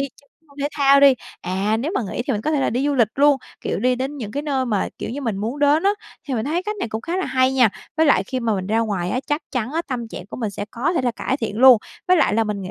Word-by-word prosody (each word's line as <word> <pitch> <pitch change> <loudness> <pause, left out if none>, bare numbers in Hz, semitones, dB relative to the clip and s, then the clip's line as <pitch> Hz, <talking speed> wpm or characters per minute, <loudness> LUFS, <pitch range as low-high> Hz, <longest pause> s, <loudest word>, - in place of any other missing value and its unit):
chơi 275 +1 -7
cái 320 - -35
môn - - -22
thể 285 - 0
thao 280 -1 +5
đi. 280 -1 +7 0.3
À, 190 +4 0
nếu 300 +8 -2
mà - - +1
nghỉ 240 - -2
thì - - +1
mình 205 - -1
có 305 - 0
thể 295 -3 +1
là - - +1
đi 255 +5 0
du 290 - +1
lịch 230 -5 +3
luôn, 285 0 +5 0.2
kiểu, - - -2
đi 250 +2 +2
đến 265 +4 -4
những 220 -7 -6
cái 285 - -2
nơi 270 -3 -1
mà, 210 -5 0
kiểu - - -5
như, 280 - -5
mình 225 -7 -2
muốn 225 +8 -3
đến 295 +2 +3
á, 395 - +4 0.4
thì 265 - -1
mình 220 - -1
thấy 335 +5 -1
cách 425 +2 -4
này 385 - -3
cũng 220 0 -4
khá 335 +9 -3
là 375 - -1
hay 260 0 +2
nha. 255 -4 +5 0.3
Với 320 - +4
lại 235 -10 +4
khi 255 +5 -3
mà 230 -3 0
mình 190 -2 -3
ra 220 +3 +1
ngoài 200 -5 -1
á, 250 - -1
chắc 295 +2 -1
chắn 250 +1 -2
á 330 - -1
tâm 240 -4 -4
trạng 180 - -8
của - - -8
mình 225 -4 -2
sẽ 200 - -5
có 260 +9 -1
thể 335 - 0
là 245 - +1
cải 260 +3 -2
thiện 225 -4 -4
luôn, 255 -2 +8 0.3
với 365 - +6
lại 285 -9 +3
là 225 - +2
mình 210 -2 -3
nghị 185 - -6
255 Hz, 325 wpm, -21 LUFS, 220-285 Hz, 0.4 s, luôn